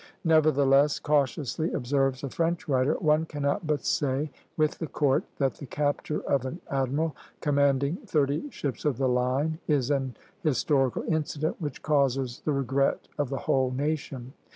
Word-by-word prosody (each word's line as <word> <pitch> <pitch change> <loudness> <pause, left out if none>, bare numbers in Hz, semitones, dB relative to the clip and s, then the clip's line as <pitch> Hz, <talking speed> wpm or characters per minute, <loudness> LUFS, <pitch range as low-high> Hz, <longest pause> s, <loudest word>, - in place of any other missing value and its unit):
"Nevertheless," 145 -3 +4
cautiously 145 +2 0
observes 135 +1 0
a 140 - -2
French 165 0 -1
writer, 135 +1 +2
"one 155 -1 +2
cannot 145 +3 -1
but 150 -1 0
say, 145 +1 0 0.3
with 155 -1 +1
the 165 - -3
Court, 140 -2 +1
that 135 -1 +1
the 140 - -10
capture 145 +2 -1
of 140 -3 0
an 130 +7 -5
admiral 140 +3 0 0.2
commanding 140 +1 +2
thirty 150 - +1
ships 140 - -4
of 145 -6 +1
the 135 0 +1
line 130 +6 +1
is 145 -3 +2
an 135 -3 -1 0.2
historical 135 -4 +1
incident 155 -1 -1
which 145 -4 -5
causes 135 -4 +1
the 155 - 0
regret 135 0 0
of 145 -3 0
the 135 - -2
whole 130 -1 +2
nation." 135 -2 -3
140 Hz, 155 wpm, -27 LUFS, 135-155 Hz, 0.3 s, Nevertheless